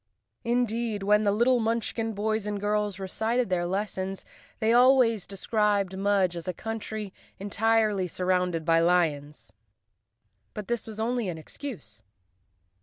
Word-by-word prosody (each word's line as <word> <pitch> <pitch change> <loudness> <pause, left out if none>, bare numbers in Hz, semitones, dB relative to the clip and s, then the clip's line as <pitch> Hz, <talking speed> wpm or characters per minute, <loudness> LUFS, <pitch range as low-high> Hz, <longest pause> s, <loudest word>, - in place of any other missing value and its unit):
Indeed, 235 -3 0
when 210 +1 +3
the 200 - +4
little 240 +4 +3
Munchkin 225 0 -1
boys 215 0 -1
and 205 -1 -2
girls 210 -1 -1
recited 220 +5 -1
their 175 -1 +1
lessons, 190 0 -3 0.3
they 220 +1 +2
always 245 -4 +4
described 200 -1 0
Mudge 195 -2 +1
as 170 +1 -6
a 180 - -2
country 220 -2 -5 0.2
entirely 210 -1 +1
surrounded 180 -2 0
by 165 -1 +4
lions. 150 -7 0 1.0
But 210 -2 -6
this 240 -1 -2
was 220 -1 -8
only 235 -2 -1
an 170 - -5
ex¬ 160 - -11
cuse. 185 - -8
205 Hz, 135 wpm, -27 LUFS, 185-225 Hz, 1.0 s, the